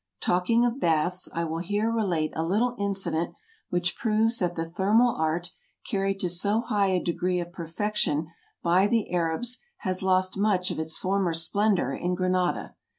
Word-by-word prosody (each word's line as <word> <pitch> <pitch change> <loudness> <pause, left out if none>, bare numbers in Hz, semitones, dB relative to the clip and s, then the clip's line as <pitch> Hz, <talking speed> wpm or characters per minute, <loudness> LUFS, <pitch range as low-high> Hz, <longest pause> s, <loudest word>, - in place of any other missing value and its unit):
Talking 230 +7 +2
of 245 +2 -1
baths, 175 - +1
I 170 - -2
will 165 0 -3
here 205 +5 0
relate 180 -9 0
a 160 - -1
little 215 +9 +1
incident 190 -5 0 0.3
which 175 0 0
proves 225 +1 +1
that 175 -2 0
the 165 0 -3
thermal 210 +8 +3
art, 165 +3 -1 0.4
carried 195 0 -1
to 180 - +1
so 200 +6 +1
high 205 -4 +1
a 185 -1 +2
degree 180 +1 -1
of 175 0 -6
perfection 170 -2 -1 0.4
by 180 +3 +4
the 225 -3 0
Arabs, 175 +9 0 0.2
has 185 -1 -1
lost 185 0 +1
much 195 -3 +2
of - - -4
its 160 0 -1
former 185 -3 0
splen 200 +6 +2
dor 135 -6 -1
in 180 +4 -1
Granada. 185 -1 0
185 Hz, 170 wpm, -27 LUFS, 170-205 Hz, 0.4 s, by